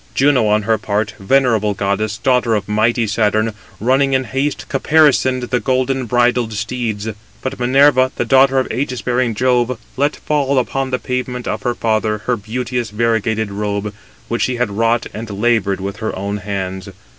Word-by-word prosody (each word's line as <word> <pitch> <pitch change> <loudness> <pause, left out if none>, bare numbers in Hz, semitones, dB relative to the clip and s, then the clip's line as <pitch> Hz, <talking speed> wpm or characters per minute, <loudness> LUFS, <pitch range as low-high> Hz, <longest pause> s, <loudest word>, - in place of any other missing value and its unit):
Juno, 135 -5 +3
on 105 0 +2
her 110 0 +1
part, 105 0 -1
venerable 110 -2 +2
goddess, 100 +2 -1
daughter 125 -4 +2
of 100 -2 -2
mighty 110 +3 +1
Saturn, 110 +1 +1 0.3
running 135 +4 +2
in 130 0 +2
haste, 135 +4 -2
caparisoned 135 -3 +3
the 125 - +2
golden 130 0 0
bridled 120 -1 +2
steeds. 110 -1 -3 0.4
But 130 0 -4
Minerva, 130 +1 +4
the - - -1
daughter 135 0 +4
of 130 - +1
ægis 125 0 -3
bearing 125 -2 0
Jove, 125 +1 +1 0.2
let 145 +2 +1
fall 140 -2 0
upon 135 +1 0
the 130 - 0
pavement 125 0 -4
of - - -2
her 120 -1 -1
father 110 -1 0
her 125 - +1
beauteous 120 +2 -3
variegated 110 -1 0
robe, 100 0 -3 0.3
which 115 -2 -2
she 125 +4 +1
had 120 -3 -1
wrought 115 +3 +1
and 110 +1 -6
laboured 100 -2 +1
with 100 +2 -5
her 110 - -3
own 100 +2 -3
hands. 95 -1 -4
120 Hz, 170 wpm, -17 LUFS, 105-130 Hz, 0.4 s, Minerva